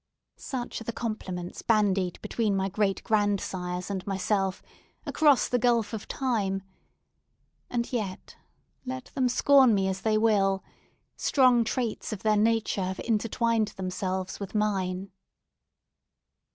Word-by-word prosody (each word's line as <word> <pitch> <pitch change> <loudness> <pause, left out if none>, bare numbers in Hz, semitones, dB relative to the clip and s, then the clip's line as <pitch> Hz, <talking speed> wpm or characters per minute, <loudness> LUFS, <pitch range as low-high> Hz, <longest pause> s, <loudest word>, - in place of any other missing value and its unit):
Such 250 -3 -5
are - - -6
the 235 - -3
compliments 185 -7 -5
bandied 200 -5 +1
between 215 -4 0
my 195 0 0
great 200 0 0
grandsires 195 -4 -1
and 190 -2 -3
myself, 195 0 0 0.4
across 295 -4 +4
the 245 - +1
gulf 235 -2 +2
of 215 - -5
time! 205 -8 -1 1.1
And 240 +1 -2
yet, 205 -6 -4 0.5
let 260 0 -6
them 255 -2 +1
scorn 265 -2 +5
me 195 -1 +1
as 190 0 -2
they 215 -1 +2
will, 200 -3 +2 0.5
strong 255 -4 +4
traits 230 0 -2
of 215 - -6
their 215 -1 +3
nature 220 -2 +1
have 185 0 -4
intertwined 230 0 +1
themselves 185 0 -3
with 200 +1 -7
mine. 195 -2 -1
210 Hz, 125 wpm, -27 LUFS, 190-235 Hz, 1.1 s, scorn